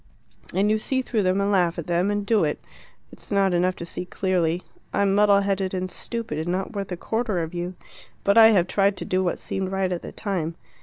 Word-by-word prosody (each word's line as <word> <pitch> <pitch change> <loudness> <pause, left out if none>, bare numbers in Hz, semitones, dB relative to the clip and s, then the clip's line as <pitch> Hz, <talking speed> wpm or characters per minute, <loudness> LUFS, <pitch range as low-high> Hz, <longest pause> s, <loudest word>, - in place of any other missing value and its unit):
And 200 +3 +2
you 215 - +2
see 260 +4 -1
through 225 -4 0
them 185 0 +2
and 200 +1 +1
laugh 180 -3 +2
at 170 - -4
them 175 +3 +1
and 205 0 -1
do 215 -2 +3
it. 150 -1 -1 0.5
It's - - -11
not 195 -2 +3
enough 180 +1 +2
to 170 - -7
see 175 - -4
clearly; 180 -2 0 0.3
I'm 200 -1 +2
muddle 200 0 +5
headed 195 -1 -1
and 185 0 -2
stupid, 220 -4 -5
and 160 - -3
not 185 +4 -2
worth 200 -2 -4
a 180 - -3
quarter 220 -4 -1
of 160 - -6
you, 175 +1 -4 0.5
but 200 - +3
I 225 -1 +9
have 200 -6 +4
tried 195 +1 +1
to - - -5
do 185 0 +1
what 175 - 0
seemed 190 -1 -4
right 190 -1 0
at 175 - -2
the - - -8
time. 175 -6 -3
190 Hz, 235 wpm, -24 LUFS, 180-200 Hz, 0.5 s, I